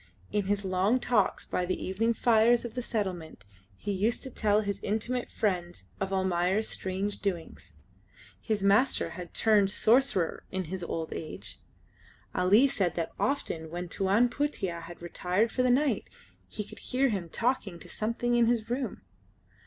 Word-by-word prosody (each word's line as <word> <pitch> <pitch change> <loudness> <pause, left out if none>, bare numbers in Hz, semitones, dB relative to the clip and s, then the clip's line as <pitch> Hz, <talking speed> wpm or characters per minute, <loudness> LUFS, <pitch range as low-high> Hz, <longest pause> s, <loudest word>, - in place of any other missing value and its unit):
In 205 -2 0
his 200 0 0
long 190 +6 +2
talks 230 -5 +1
by 180 - -1
the 185 +1 -2
evening 225 +5 0
fires 235 +1 +4
of 235 - -6
the 250 - -2
settlement 180 - -4 0.3
he 205 - -3
used 210 +5 0
to 265 - -6
tell 210 -2 +2
his 200 -2 -3
intimate 235 +4 -2
friends 180 -4 -2 0.2
of 195 0 -2
Almayer's 190 +2 +1
strange 190 +2 -2
doings. 175 -5 -4 0.7
His 215 -3 -1
master 200 +7 +3
had 180 -1 -9
turned 210 -3 +4
sorcerer 220 -5 +2
in 190 0 -2
his 185 -2 -4
old 165 -1 -3
age. 155 - -7 0.7
Ali 195 +8 +5
said 190 - 0
that 165 -2 -2
often 165 - -1
when 175 +1 -5
Tuan 200 +7 +3
Putih 240 - -2
had 170 +1 -10
retired 180 +5 0
for 255 - 0
the 255 - +3
night 255 -3 +2 0.4
he 210 - -5
could - - -12
hear 265 +1 +1
him 190 -6 -3
talking 225 -4 -1
to - - -12
something 235 +2 -1
in 235 -1 +4
his 230 -1 0
room. 250 -3 -2
205 Hz, 160 wpm, -29 LUFS, 185-235 Hz, 0.7 s, Ali